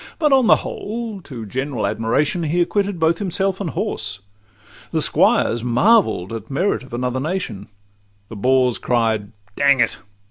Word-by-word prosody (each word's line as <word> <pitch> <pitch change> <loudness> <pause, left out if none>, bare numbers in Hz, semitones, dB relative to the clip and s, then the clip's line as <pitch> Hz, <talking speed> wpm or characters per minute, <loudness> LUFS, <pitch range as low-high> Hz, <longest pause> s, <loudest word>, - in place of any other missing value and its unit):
But 300 -4 +3
on 260 -4 +4
the - - +7
whole, 220 -2 -5
to 120 -6 -7
general 130 +3 -3
admiration 115 - 0
He 165 +2 0
acquitted 200 +1 0
both 165 +1 +2
himself 195 0 -1
and 185 - -2
horse: 100 -6 -3 0.7
the - - -1
squires 115 0 +2
Marvell'd 125 - +2
at 110 -1 -7
merit 175 +9 0
of 130 -2 -8
another 125 +1 -2
nation; 150 - -4 0.6
The 110 - -9
boors 125 +3 +2
cried 110 -4 0 0.2
'Dang 140 -1 +4
it? 115 - +1
135 Hz, 150 wpm, -20 LUFS, 115-190 Hz, 0.7 s, the